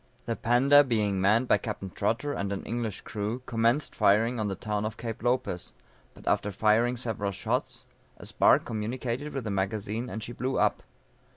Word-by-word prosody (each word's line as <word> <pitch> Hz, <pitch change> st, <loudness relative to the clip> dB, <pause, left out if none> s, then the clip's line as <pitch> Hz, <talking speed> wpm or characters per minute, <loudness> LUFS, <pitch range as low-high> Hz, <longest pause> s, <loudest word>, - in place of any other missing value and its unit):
_] -, -, -35 dB
The 115 Hz, -, -1 dB
Panda 135 Hz, +6 st, +5 dB
being 105 Hz, -7 st, 0 dB
manned 110 Hz, +6 st, +3 dB
by -, -, +4 dB
Capt. 100 Hz, -4 st, -5 dB
Trotter 140 Hz, +6 st, -1 dB
and 100 Hz, -5 st, -3 dB
an 100 Hz, -, -3 dB
English 115 Hz, -3 st, -3 dB
crew, 110 Hz, +4 st, -4 dB
commenced 115 Hz, +5 st, +1 dB
firing 110 Hz, +3 st, +3 dB
on 110 Hz, -, 0 dB
the 95 Hz, -, -2 dB
town 105 Hz, +1 st, -2 dB
of 110 Hz, +1 st, -4 dB
Cape 115 Hz, -2 st, -5 dB
Lopez, 120 Hz, -7 st, -1 dB, 0.4 s
but -, -, -15 dB
after 105 Hz, -, +1 dB
firing 110 Hz, +5 st, +2 dB
several 110 Hz, -4 st, -2 dB
shots, 95 Hz, -2 st, -2 dB, 0.3 s
a -, -, -11 dB
spark -, -, +4 dB
communicated 120 Hz, +5 st, -3 dB
with 135 Hz, -2 st, -4 dB
the 110 Hz, -, -3 dB
magazine 105 Hz, +4 st, -2 dB
and 110 Hz, -, -5 dB
she 120 Hz, -, -6 dB
blew 130 Hz, +2 st, -2 dB
up. -, -, +2 dB
115 Hz, 185 wpm, -28 LUFS, 105-120 Hz, 0.4 s, Panda